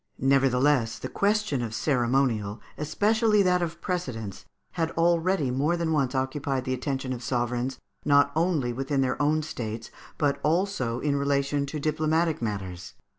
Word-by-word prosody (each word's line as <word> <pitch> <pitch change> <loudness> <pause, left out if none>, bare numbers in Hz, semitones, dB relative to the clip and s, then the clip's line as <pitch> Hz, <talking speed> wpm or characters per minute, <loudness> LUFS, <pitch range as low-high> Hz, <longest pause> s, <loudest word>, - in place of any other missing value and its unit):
] - - -45
Nevertheless 135 -2 +3
the - - -6
question 205 - +1
of 110 -2 -4
ceremonial, 120 -6 +1 0.2
and 150 - -4
especially 215 +3 +3
that 180 -1 +3
of 170 0 -3
precedence, 120 - -4 0.3
had 165 -2 -1
already 170 -3 +2
more 145 +7 +1
than 165 -1 0
once 135 -3 +1
occupied 130 0 -1
the 130 - -1
attention 130 0 -2
of 120 - -6
sovereigns, 125 +1 -1 0.3
not 145 -1 +4
only 160 -7 +1
within 135 +2 -1
their 130 +2 0
own 155 +2 +2
states, 115 -6 -5 0.3
but 140 -2 +1
also 155 - 0
in 145 -1 +1
relation 140 0 0
to 150 +2 -4
diplomatic 155 +1 +1
matters. 95 -5 -5
140 Hz, 155 wpm, -27 LUFS, 125-160 Hz, 0.3 s, not